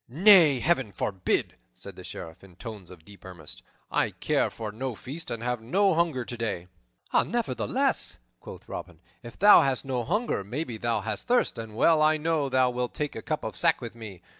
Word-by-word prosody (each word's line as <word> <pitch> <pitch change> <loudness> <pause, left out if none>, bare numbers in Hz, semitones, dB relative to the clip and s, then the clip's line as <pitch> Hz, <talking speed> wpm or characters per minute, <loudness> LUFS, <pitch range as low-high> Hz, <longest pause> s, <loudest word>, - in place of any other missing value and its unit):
"Nay, 165 - +6
Heaven 135 -9 +1
forbid!" 95 -1 -2 0.2
said - - -11
the - - -11
Sheriff 80 +2 -9
in 95 -3 -16
tones 105 -2 -9
of 85 -3 -14
deep 100 +1 -15
earnest. 85 -5 -10 0.3
"I - - +2
care - - 0
for 110 -2 -6
no 125 +3 -4
feast 145 +10 -7
and 115 0 -4
have 125 -1 -2
no 190 - +2
hunger 160 -7 0
today." 115 -7 -4 0.5
"Nevertheless," - - +1 0.2
quoth - - -11
Robin, 85 -3 -8 0.2
"if 120 -1 -11
thou 205 +2 +8
hast 135 -1 0
no 130 -3 -2
hunger, 205 - -1
maybe 120 +3 -4
thou 115 -1 -1
hast 105 0 -4
thirst, 245 - +2
and 110 -1 -8
well 160 +6 +4
I 155 0 +4
know 155 -2 0
thou 130 -1 +3
wilt 125 0 -3
take 150 -2 -3
a 110 - -5
cup - - -3
of - - -5
sack - - +3
with 115 - -7
me. 110 -6 -10
120 Hz, 190 wpm, -27 LUFS, 105-155 Hz, 0.5 s, thou